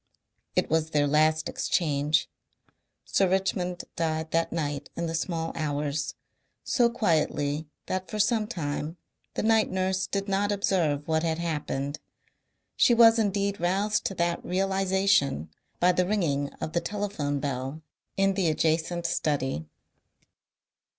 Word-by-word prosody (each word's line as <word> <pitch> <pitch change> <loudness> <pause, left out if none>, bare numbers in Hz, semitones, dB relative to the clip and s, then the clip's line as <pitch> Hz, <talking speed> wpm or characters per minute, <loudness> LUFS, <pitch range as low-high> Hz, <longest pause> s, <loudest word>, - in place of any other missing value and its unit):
It - - +2
was 160 0 +1
their 150 -2 +2
last 155 +2 +3
exchange. 150 -2 +1 0.8
Sir 195 -2 +2
Richmond 180 -2 0
died 160 -1 -1
that 165 0 +1
night 145 -3 -3
in 170 - -2
the 165 - -3
small 165 0 -2
hours, 145 -1 -2 0.5
so 240 -3 +3
quietly 155 - 0 0.2
that 185 0 -3
for 215 - -4
some 215 +1 +2
time 155 -4 -4 0.4
the - - -1
night 220 0 +3
nurse 190 0 0
did 200 0 -2
not 200 +1 +1
observe 170 -8 +1
what 160 0 +2
had 160 -1 0
happened. 150 -4 -3 0.8
She 240 - +5
was 230 0 +7
indeed 200 -1 0
roused 195 +5 +1
to 195 - -2
that 170 0 0
realization 190 - +1 0.3
by 180 +1 +5
the 180 0 +1
ringing 145 -9 0
of 160 0 -6
the 170 - +1
telephone 175 -8 -2
bell 135 +2 -4 0.3
in 195 0 +3
the 190 -3 +1
adjacent 160 +2 0
study. 135 - -1
170 Hz, 135 wpm, -27 LUFS, 150-195 Hz, 0.8 s, was